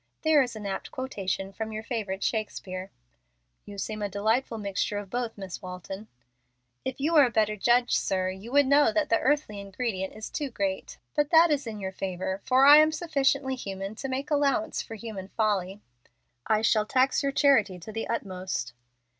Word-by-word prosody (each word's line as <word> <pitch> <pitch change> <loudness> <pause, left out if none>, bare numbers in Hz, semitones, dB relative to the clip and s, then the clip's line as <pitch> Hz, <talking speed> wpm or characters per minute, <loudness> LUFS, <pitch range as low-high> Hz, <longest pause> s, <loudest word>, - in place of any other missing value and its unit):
There 315 -2 +5
is 245 -3 -2
an 210 -1 -7
apt 195 -1 -4
quotation 195 -6 -4
from 220 +2 -5
your 215 0 -5
favorite 205 -5 -3
Shakespeare." 190 -4 -3 0.8
"You 205 - -10
seem 215 +2 -4
a 205 - -1
delightful 220 +5 0
mixture 205 0 -2
of 200 -2 -6
both, 240 -2 -3
Miss 190 -3 -7
Walton." 185 +3 -8 0.8
"If 260 0 -4
you 305 +5 0
were 295 -4 +7
a - - 0
better 215 -2 +1
judge, 240 +4 +2
sir, 185 -1 0
you 195 +5 -9
would 285 +1 +5
know 280 -3 +5
that 305 +4 0
the 225 - +3
earthly 265 -6 0
ingredient 195 -1 -4
is 215 0 -7
too 290 -3 -3
great. 195 -5 -3 0.2
But 295 -1 +2
that 330 0 +6
is 280 -4 0
in 215 -2 -5
your 190 -1 -4
favor, 190 0 -4
for 260 +1 +5
I 290 +1 +10
am 310 +1 +6
sufficiently 275 -4 0
human 195 -4 -5
to 270 - -4
make 270 +3 -3
allowance 280 -6 +1
for 225 - -8
human 215 -4 -7
folly." 200 -2 -1 0.7
"I 215 0 +2
shall 215 -1 +3
tax 260 +2 +2
your 280 -1 0
charity 265 -10 +3
to 180 +5 -9
the 225 +1 -4
utmost." 185 - -3
220 Hz, 190 wpm, -27 LUFS, 195-265 Hz, 0.8 s, I